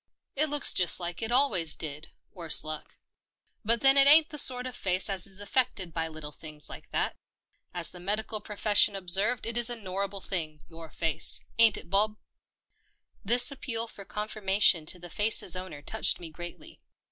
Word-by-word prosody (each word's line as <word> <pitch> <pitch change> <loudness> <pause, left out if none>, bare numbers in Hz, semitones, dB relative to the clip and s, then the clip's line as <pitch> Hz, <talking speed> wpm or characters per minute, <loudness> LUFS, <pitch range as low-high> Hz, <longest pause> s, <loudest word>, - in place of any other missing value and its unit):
" - - -60
It 310 - +6
looks 295 0 +4
just 180 0 +2
like 175 +1 -6
it 225 - -2
al 270 +3 +3
wa}^s 165 -4 +1
did, 150 0 -5 0.2
worse 165 -5 +1
luck. 155 -1 -9 0.7
But 230 +1 +2
then 270 0 +5
it 275 0 +6
ain't 305 +2 +6
the 300 - -3
sort 250 -2 +6
of 255 -1 -7
face 185 -1 +1
as 190 -1 0
is 195 0 -6
affected 205 -5 -2
by 165 0 -4
little 155 -2 -9
things 150 -1 -11
like - - -12
that. - - -3 0.6
As 175 -2 -3
the 180 - -12
medical 210 +3 -5
profession 210 -1 +1
ob 180 -3 -2
served 210 +6 +2
it 230 +1 -3
is 240 0 +1
a 240 - -2
norrible 195 -2 -7
thing 155 -6 -6
— - - -36
your 165 -1 -12
face. 160 -1 0 0.2
Ain't 225 -3 +4
it, - - -11
Bob?" 210 +2 +1 1.1
This 240 +5 +2
appeal 235 -4 -4
for 200 - -11
confirmation 200 -5 0
to 180 - +2
the 175 0 -11
face's 210 -3 +2
owner 185 -6 -9
touched 220 +8 +2
me 170 -2 -10
greatly. 175 - -12
195 Hz, 195 wpm, -27 LUFS, 170-230 Hz, 1.1 s, It